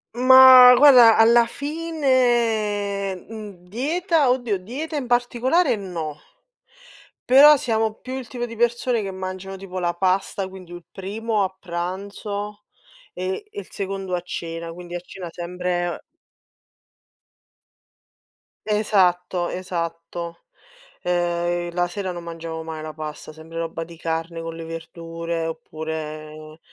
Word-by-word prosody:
Ma 255 0 +9
guarda 250 -5 +8
alla 230 +1 +6
fine 240 -10 0
mhmm, 200 -3 -11
dieta, 305 - +1
oddio 245 -5 +1
dieta 270 - -6
in 280 - -2
particolare, 245 +5 +2
no 170 -7 -5 1.1
però 290 +3 +9
siamo 225 -4 0
più 255 - -9
il 245 -4 -8
tipo 240 +1 -4
di 230 - -9
persone 240 0 +1
che 195 - -4
mangiano 190 +1 -6
tipo 185 -1 -6
la 175 -1 0
pasta, 190 +2 0
quindi 185 -2 -12
u 175 0 -8
primo 210 +2 -2
a 190 0 -3
pranzo, 200 +4 -5 0.5
e 185 - -4
il 410 -1 -8
secondo 195 -2 -4
a 175 - -3
cena, 165 -1 -6
quindi 175 +1 -9
a - - -2
cena 180 0 -9
sempre 175 0 -3 2.6
Esatto, 180 -4 +1
esatto. 170 -1 -5 0.6
Ehm, 175 0 -1
la 175 0 +1
sera 190 0 -4
non 175 -1 -7
mangiamo 165 -1 -6
mai 160 -1 -6
la 155 0 -7
pasta, 155 0 -7
sempre 160 +1 -11
roba 165 0 -4
di 170 0 -13
carne 165 0 -3
con 165 0 -6
le 165 0 -7
verdure 165 0 -5
oppure 155 -1 -7
185 Hz, 125 wpm, -22 LUFS, 170-230 Hz, 2.6 s, Ma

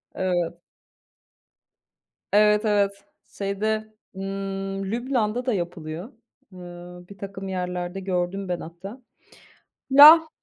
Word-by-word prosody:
Evet. 175 -2 -2 1.7
Evet, 210 +1 +4
evet, 200 -1 0 0.3
şeyde, 215 +2 -2 0.2
ımm, 195 0 -4
Lübnan'da 240 -1 -1
da 255 - +1
yapılıyor, 175 - -5 0.4
ımm, 175 0 -11
birtakım 195 0 -8
yerlerde 180 0 -4
gördüm 190 +1 -2
ben 175 -1 -2
hatta, 190 +9 -10 0.9
la 310 +4 +9
195 Hz, 85 wpm, -24 LUFS, 180-210 Hz, 1.7 s, la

